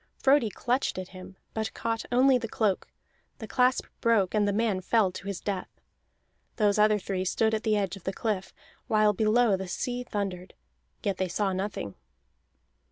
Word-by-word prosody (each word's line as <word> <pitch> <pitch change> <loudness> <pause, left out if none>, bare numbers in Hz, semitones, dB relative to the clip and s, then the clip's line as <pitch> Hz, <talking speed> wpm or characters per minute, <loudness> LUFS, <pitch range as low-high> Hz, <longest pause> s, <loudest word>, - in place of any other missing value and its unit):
Frodi 270 -4 +4
clutched 250 +4 -1
at 185 -1 -5
him, 185 0 -11 0.2
but 220 0 -3
caught 225 0 -2
only 255 +1 +5
the 230 - -4
cloak; 210 -3 0 0.5
the 220 - -7
clasp 250 +2 +2
broke, 220 -6 +2
and 210 -1 +2
the - - +2
man 205 -2 0
fell 205 0 +2
to 195 - -9
his 200 -2 -3
death. 195 -3 -3 0.9
Those 210 -1 +2
other 215 0 +5
three 190 -2 -3
stood 220 +4 +1
at 215 - 0
the 215 -2 +1
edge 195 -3 -1
of 195 - -14
the 190 - 0
cliff, 200 -2 -2 0.4
while 215 -1 +4
below 215 +1 +3
the 190 0 -5
sea 245 +7 -3
thundered, 195 -6 -4 0.5
yet 200 -4 -1
they 185 - 0
saw 195 +2 0
nothing. 190 - -3
210 Hz, 175 wpm, -28 LUFS, 190-225 Hz, 0.9 s, only